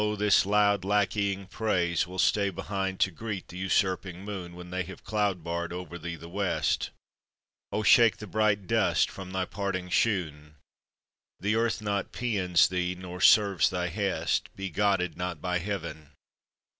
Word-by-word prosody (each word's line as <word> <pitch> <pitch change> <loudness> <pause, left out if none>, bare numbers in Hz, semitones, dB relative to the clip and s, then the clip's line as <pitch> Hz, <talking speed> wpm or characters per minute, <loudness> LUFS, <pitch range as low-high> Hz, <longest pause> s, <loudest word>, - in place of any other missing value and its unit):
this 105 -2 +4
loud, 100 -1 +3
lackeying 100 0 0
praise 90 -5 0
Will 90 +1 -8
stay 100 +2 +3
behind 95 +1 -3
to 95 - +3
greet 100 +1 -6
the 90 - -9
usurping 95 -1 0
moon, 90 -4 -6
When 90 0 -10
they 90 0 -1
have 85 - -8
cloud 105 -5 -1
barred 85 0 -3
over 90 0 -6
thee 85 +1 -5
the 85 +1 -11
West. 95 +2 0 0.8
Oh, 105 +2 -1
shake 115 +1 +6
the 105 - -8
bright 105 0 +1
dust - - +2
from 95 -1 -8
thy 95 0 -1
parting 95 -2 -3
shoon! 75 -8 0 0.8
The 105 +3 0
earth 115 -1 0
not 100 -1 -2
pæans 95 -8 +2
thee, 90 0 -1
nor 90 0 -8
serves 100 -4 +5
thy 90 -1 -2
hest; 100 +2 -1
Be 95 -1 -5
godded 95 -1 +1
not 90 -3 -3
by 90 +2 -1
Heaven! 85 -5 -5
95 Hz, 155 wpm, -28 LUFS, 90-100 Hz, 0.8 s, shake